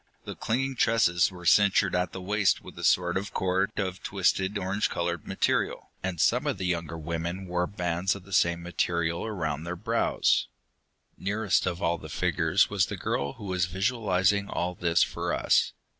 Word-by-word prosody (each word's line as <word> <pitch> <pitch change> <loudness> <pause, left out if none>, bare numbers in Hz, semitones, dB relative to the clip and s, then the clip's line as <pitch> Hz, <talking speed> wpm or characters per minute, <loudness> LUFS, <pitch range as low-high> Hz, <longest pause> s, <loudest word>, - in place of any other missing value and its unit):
The - - -5
clinging 130 +3 -2
tresses 100 -8 +3
were 90 -1 -11
cinctured 100 +1 +4
at 90 0 0
the 95 - -7
waist 100 +1 +1
with - - -11
a - - -7
sort 90 0 +3
of 100 +2 -5
cord 95 +1 +1
of 95 -2 -2
twisted 95 +1 0
orange 100 +2 -1
colored 85 -1 -3
material, - - -1
and 90 -3 -3
some - - +2
of - - 0
the 90 - -3
younger 85 -2 -2
women 85 +4 -4
wore 90 0 -1
bands 90 0 -1
of 100 - -10
the 100 +1 -11
same 85 -1 +2
material 85 -1 -1
around 80 -9 -3
their 85 +1 -4
brows. 85 - +1 0.7
Nearest 100 0 0
of 90 +1 -3
all 85 0 +1
the 80 - -10
figures - - +2
was - - +1
the - - -5
girl 70 0 -2
who 105 - -10
was 90 -2 0
visualizing 100 0 +1
all 90 +1 -2
this 85 -1 +2
for - - -2
us. - - +2
90 Hz, 180 wpm, -27 LUFS, 85-100 Hz, 0.7 s, cinctured